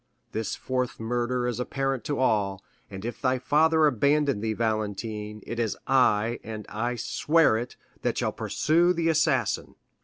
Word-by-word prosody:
This 110 0 -2
fourth 125 -1 -2
murder 120 +2 -1
is 120 -1 -2
apparent 135 -1 -2
to 145 - -1
all, 100 -6 +1 0.3
and 95 0 -8
if 120 - -5
thy 130 0 +2
father 160 +4 +3
abandon 140 -1 +2
thee, 110 0 -1
Valentine, 110 -1 -3
it 115 +1 -5
is 115 -3 -1
I, 120 -3 +3
and 110 -1 -7
I 120 +3 -2
swear 150 +4 +2
it, 120 +2 -4 0.3
that - - -1
shall - - 0
pursue 170 +3 +2
the 165 -1 0
assassin." 150 -8 +1
120 Hz, 155 wpm, -26 LUFS, 110-140 Hz, 0.3 s, father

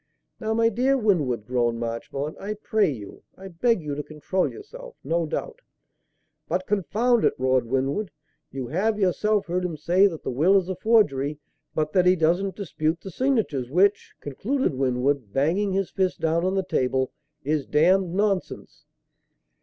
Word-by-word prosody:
"Now, 220 -1 -1
my 230 0 +4
dear 255 +5 +2
Winwood," 150 - +1
groaned 120 -1 0
Marchmont, 120 +6 -4
"I 210 +2 -4
pray 215 -1 +1
you 110 -8 -8 0.2
I 195 0 -9
beg 190 +2 +1
you 150 -1 -3
to 145 - -3
control 155 +5 -2
yourself. - - -11
No 165 0 0
doubt - - -4 0.5
" - - -50
"But 185 +2 -1
confound 220 +5 +1
it!" - - +3
roared 130 -1 +1
Winwood, 135 - -1 0.4
"you 135 -2 -4
have, 200 - 0
yourself, 210 +2 +1
heard 180 +1 -2
him 170 -3 -3
say 175 +6 +4
that 165 -5 -6
the - - -2
will 165 +10 +4
is 190 -1 -1
a 185 - -2
forgery, 155 - +2 0.4
but 155 -1 -1
that 180 -1 +4
he 180 - +6
doesn't 175 +4 +1
dispute 165 -4 -2
the 195 - -8
signatures; 205 - 0
which," 195 +7 +2
concluded 230 - -1
Winwood, 130 -2 0
banging 175 +9 +1
his 195 -1 -1
fist 190 -1 -1
down 165 +1 +1
on 190 +1 0
the 190 - +1
table, 130 -5 0 0.3
"is 145 0 -1
damned 180 +4 +3
nonsense." 200 -2 -2
180 Hz, 170 wpm, -25 LUFS, 140-205 Hz, 0.5 s, he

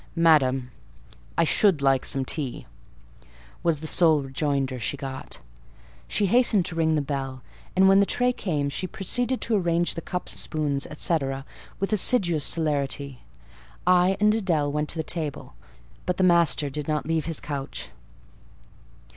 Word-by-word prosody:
"Madam, 135 -7 +3 0.7
I - - +4
should 180 +1 +3
like 135 -1 +2
some 135 -1 0
tea," 140 -3 -4 1.0
was 165 -3 0
the - - -7
sole 155 -2 +3
rejoinder 135 -1 -2
she 130 +5 -2
got. 135 -1 -6 0.7
She 205 - 0
hastened 215 -3 +3
to 170 - -3
ring 160 -1 +2
the 150 - 0
bell; 135 -2 -4 0.3
and 190 +1 +5
when 195 0 +6
the 200 - +3
tray 250 0 +1
came, 150 -11 -2
she 185 +6 -4
proceeded 245 +7 0
to 230 - 0
arrange 175 -3 +1
the 165 - -6
cups, 180 +2 -3
spoons, 145 -3 0
&c., 165 +2 +2 0.6
with 195 +2 -1
assiduous 180 - +3
celerity. 140 -4 -1 0.6
I 180 +1 +4
and 210 0 +4
Adèle 165 -9 0
went 150 +1 -2
to - - -2
the 160 - -1
table; 155 - -4 0.5
but 180 - 0
the 190 - +1
master 170 -4 +4
did 150 +1 -5
not 155 -1 -1
leave 160 -1 -1
his 165 -2 -1
couch. 140 -2 -6
160 Hz, 155 wpm, -25 LUFS, 140-180 Hz, 1.0 s, when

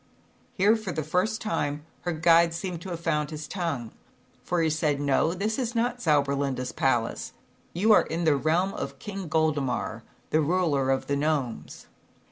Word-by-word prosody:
Here, 205 +3 +4
for 215 -4 -4
the 155 -2 -2
first 180 +8 0
time, 150 -8 -2 0.2
her 175 - 0
guide 165 +1 +4
seemed 175 -1 -4
to 190 - -7
have 170 -2 -5
found 150 -3 0
his 155 -2 -6
tongue, 160 - -3 0.5
for 175 -2 0
he 160 - +2
said: 150 -2 0
"No, 145 +4 +2
this 215 +6 -1
is 240 -2 -2
not 240 +1 0
Zauberlinda's 140 - +1
Palace. 120 -4 0 0.4
You 215 +6 +4
are - - +5
in 165 +2 -2
the 155 -3 +4
realm 165 +7 +1
of - - -5
King 195 -3 -6
Goldemar, 145 -8 0 0.3
the 155 - +3
ruler 155 -4 +1
of 135 0 +1
the 140 - 0
Gnomes." 140 -5 -2
160 Hz, 170 wpm, -27 LUFS, 145-185 Hz, 0.5 s, are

